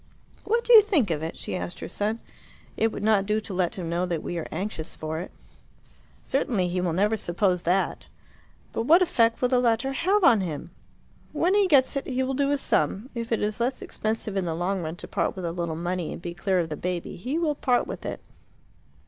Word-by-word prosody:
"What 465 +3 +1
do 485 - +4
you 445 - +12
think 320 - +1
of 155 -2 -1
it?" 160 +1 -5
she - - -5
asked 180 -1 -5
her - - -5
son. 215 +4 -2 0.5
"It 225 0 +1
would 205 - -6
not 210 -2 +3
do 210 +1 +2
to 205 - -7
let 180 -2 0
him 180 -3 -5
know 170 +2 -1
that 170 -3 -2
we 175 - -3
are 160 - -5
anxious 170 -2 -4
for 155 0 -4
it." 180 - -6 0.9
"Certainly 230 -9 0
he 180 +1 -1
will 180 -2 0
never 205 +5 +2
suppose 180 -2 0
that." 185 +3 0 0.7
"But 225 - -2
what 340 +4 +7
effect 230 -8 +2
will 250 - +4
the 250 -1 +3
letter 240 +2 +1
have 380 +8 +2
on 235 - +6
him?" 170 -1 -5 0.6
"When 340 +5 +2
he 405 -1 +4
gets 280 -5 +4
it 275 - -2
he 260 -1 0
will 265 +1 -1
do 280 +1 +1
a 285 - +2
sum. 205 - 0
If 235 -1 -5
it 225 - +1
is 210 +1 -1
less 250 +3 -1
expensive 220 -1 -3
in 190 -2 0
the 165 -2 -2
long 180 +3 -1
run 160 0 -4
to - - -10
part - - -1
with 185 -2 -5
a 170 - -1
little 170 -2 -3
money 175 0 -2
and - - -8
to - - -3
be - - -6
clear 190 +1 0
of 170 -2 0
the 150 - -3
baby, 180 +1 -3
he 255 - -3
will 325 -3 +1
part 255 -4 +1
with - - -7
it. - - -5
210 Hz, 235 wpm, -26 LUFS, 175-260 Hz, 0.9 s, you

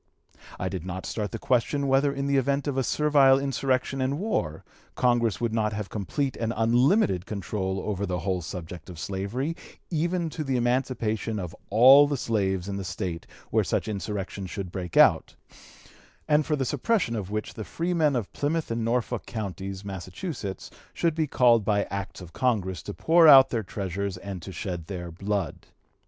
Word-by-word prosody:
I 90 - -1
did 95 -3 -4
not 95 0 -5
start 105 -2 -3
the 115 - -4
question 140 +3 +1
whether 135 +1 +3
in 140 0 -3
the 140 0 +2
event 140 +2 0
of 140 - -1
a 135 - +2
servile 140 -2 +4
insurrection 135 -1 -1
and 135 +2 0
war, 90 - -2 0.3
Congress 120 -5 +2
would 115 -2 -1
not 110 -1 0
have 105 -1 -4
complete 130 +7 -2
unlimited 115 - +2
control 95 -1 -3
over 100 -1 -3
the 90 0 -1
whole 90 +1 -1
subject 85 0 -7
of 90 - -9
slavery, 100 - -3 0.4
even 170 +1 0
to 155 - -4
the 135 -3 0
emancipation 120 -3 0
of 90 -4 -5
all 130 +7 +8
the 145 -1 -1
slaves 95 -6 -1
in 100 0 -3
the 100 - -4
State 90 -3 -4 0.2
where - - +3
such - - -1
insurrection 100 -2 -4
should 90 -1 -6
break 90 -3 -5
out, - - +5 0.9
and 150 0 +3
for 150 - +2
the 135 -2 -1
suppression 185 - 0
of 100 -4 -4
which 105 +1 -3
the 110 - -6
freemen 165 - 0
of 115 -5 -3
Plymouth 155 -1 -1
and 115 0 -1
Norfolk 120 0 -1
counties, 100 -3 -5
Massachusetts, 100 - -6 0.2
should 170 -2 +1
be 160 -1 0
called 120 -4 +4
by 100 0 +2
Acts 100 -1 -5
of 85 -2 -11
Congress 95 -9 0
to 100 - -7
pour 165 0 +5
out 135 -3 +9
their 115 - 0
treasures 100 -1 -4
and 95 -1 -7
to 95 - -8
shed 90 -1 -5
their 85 -3 -6
blood. 95 -2 -3
110 Hz, 175 wpm, -26 LUFS, 95-135 Hz, 0.9 s, out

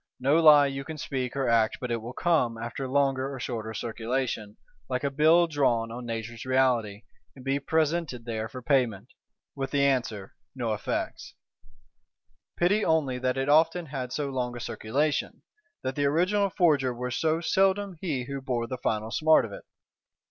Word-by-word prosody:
No 140 +6 +3
lie 150 -2 +8
you 135 0 -3
can 160 +2 -7
speak 135 -5 -3
or 135 -2 0
act 115 -2 +2
but 125 -2 -4
it 115 -1 -1
will 115 +2 -7
come, 135 -9 +1
after 120 +4 -5
longer 135 0 +1
or 135 - -6
shorter 115 -3 -4
circulation, 115 -2 -3 0.3
like 130 +1 -2
a 140 - 0
Bill 160 +5 +5
drawn 125 -8 +1
on 120 +1 -7
Nature's 115 0 -5
Reality, 125 -5 +1 0.3
and 130 -1 -13
be 135 +1 +1
presented 155 -4 -1
there 110 -2 -3
for 125 +3 -9
payment,—with 130 +1 -2
the 140 0 +1
answer, 120 -8 0 0.2
No 120 -4 -1
effects. 105 - -4 1.2
Pity 200 +5 +2
only 145 -6 +1
that 130 +1 -1
it 135 +1 -1
often 165 +3 +3
had 130 -4 -5
so 145 0 -2
long 125 -2 -3
a - - -6
circulation: 140 +7 -2 0.4
that 130 - -2
the 145 - 0
original 185 +7 +2
forger 145 -8 +2
were 125 +1 -4
so 160 +5 +1
seldom 195 +2 +1
he 145 -9 -2
who 135 +1 -5
bore 125 -3 -2
the 125 +1 -6
final 110 -1 -2
smart 155 0 +4
of 110 - -9
it! - - -10
130 Hz, 170 wpm, -27 LUFS, 120-150 Hz, 1.2 s, lie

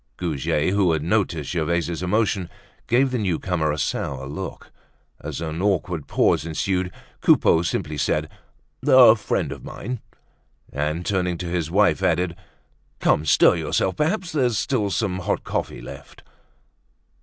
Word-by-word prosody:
Goujet, 75 -2 0
who 95 -4 +3
had 80 -2 -1
noticed 85 -5 0
Gervaise's 85 0 -1
emotion, 100 -1 0 0.4
gave 130 +3 +3
the 125 - -1
newcomer 90 -4 0
a 75 - -3
sour 65 -3 -2
look. 75 +8 -7 0.5
As 75 +1 -6
an 80 +1 -4
awkward 90 -6 -1
pause - - +2
ensued 90 +3 -1 0.3
Coupeau 80 - +4
simply 80 -3 -2
said: 75 +1 0 0.6
"A 130 -5 +8
friend 110 - -2
of - - -8
mine." 125 +2 -6 0.7
And 75 +5 -2
turning 90 -3 0
to 90 - -5
his 85 -2 -2
wife, 100 +2 +3
added: 90 -1 +1 0.6
"Come, 75 - +2
stir 85 - +5
yourself! 80 +4 0
Perhaps 175 +4 0
there's 125 -8 +1
still 105 -1 0
some 95 -1 -1
hot 90 - -2
coffee - - -4
left." - - -11
90 Hz, 140 wpm, -23 LUFS, 80-105 Hz, 0.7 s, A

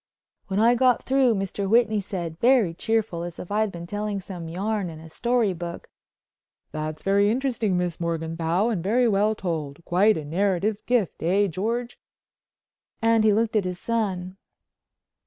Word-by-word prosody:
When 195 +1 -1
I 230 +2 +5
got 250 0 +2
through 260 -3 +3
Mr. 195 0 -3
Whitney 220 -2 +3
said, 175 -4 -5
very 235 -8 +4
cheerful, 215 -2 -1
as 175 0 -6
if 180 - -8
I'd 215 0 +1
been 170 -1 -7
telling 205 +2 -3
some 180 -4 -8
yarn 200 +2 -2
in 160 -1 -9
a 160 0 -12
story 235 +2 +1
book: 170 0 -7 0.8
"That's 155 0 -5
very 200 +1 +3
interesting, 235 -5 0
Miss 175 -2 -2
Morganthau, 165 +4 -1
and 195 -8 -2
very 240 +5 +3
well 210 +1 +2
told. 165 -5 -4
Quite 200 +4 +3
a 155 - -5
narrative 195 +5 0
gift, 240 -7 0
eh 190 +5 +2
George?" 230 +7 -3 1.0
and 225 -1 +3
he 215 - +5
looked 225 +2 +1
at 210 - +3
his 180 -1 -3
son. 190 -5 -2
200 Hz, 160 wpm, -25 LUFS, 170-220 Hz, 1.0 s, I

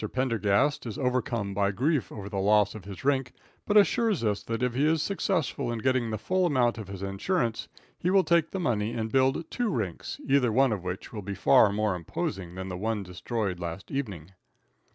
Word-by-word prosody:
Pendergast 130 +3 +1
is 110 - -5
overcome 120 -6 -1
by 100 0 +1
grief 135 - 0
over 100 -2 -7
the 100 -1 -3
loss 105 +1 +3
of 110 -4 -10
his 100 +4 -9
rink, 135 -2 +1 0.3
but 205 - +4
assures 210 - +3
us 105 -2 0
that 115 +3 -3
if 125 -1 +1
he 135 +4 +1
is 160 +1 +2
successful 170 -7 -1
in 120 - -2
getting 130 0 +1
the 110 - -2
full 185 - +1
amount 120 -6 +2
of 105 - -7
his 100 -1 -7
insurance 115 - -1 0.3
he 175 - 0
will 190 0 +5
take 170 -2 +2
the 190 - -4
money 115 - 0
and 110 -1 -3
build 135 +4 +2
two 245 -2 0
rinks, 105 - -3
either 135 -4 +3
one 130 +2 +4
of 100 -4 -2
which 90 +5 -5
will 105 - -5
be 100 +1 -5
far 100 +1 +5
more 105 0 0
imposing 90 +1 -4
than 95 0 -5
the 90 -1 -5
one 110 +1 -2
destroyed 95 +1 -3
last 85 +2 -6
evening. 100 - -4
115 Hz, 205 wpm, -28 LUFS, 100-135 Hz, 0.3 s, will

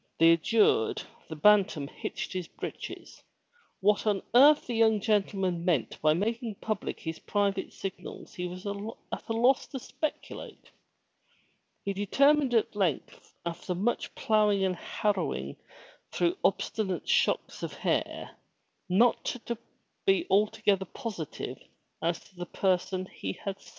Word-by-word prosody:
Thus 165 +1 +6
adjured, 205 - +3 0.3
the 160 - -5
Bantam 195 -4 +4
hitched - - -5
his 180 -3 -3
breeches. - - -8 0.6
What 210 +2 +3
on 205 -2 +1
earth 285 +5 +7
the 245 - -4
young 220 -2 +4
gentleman 195 -4 0
meant 170 -9 0
by 155 0 +4
making 225 +3 -2
public 215 0 -3
his 160 0 -5
private 200 -2 -1
signals 195 -1 -7
he 180 -3 -3
was 180 +2 -8
at 205 +4 -6
a - - +1
loss 245 +4 +3
to 270 - -6
speculate. 300 +4 -6 1.1
He 200 - -1
determined 270 +7 +3
at 225 - +3
lengta 190 -8 -1 0.2
after 170 +2 -3
much 210 +7 -1
ploughing 210 -5 +3
and 185 -1 0
harrowing 170 - -2 0.5
through 175 0 +1
obstinate 195 -2 0
shocks - - +1
of - - -4
hair, - - -2 0.5
to 235 +3 +1 0.5
be 390 - +7
not - - -12
altogether 200 -1 +3
positive 175 - -6 0.4
as 170 +1 0
to 190 - -22
the 175 0 -5
person 185 0 0
he 95 - -5
had 195 - -6
seen. - - -15
200 Hz, 135 wpm, -29 LUFS, 180-220 Hz, 1.1 s, earth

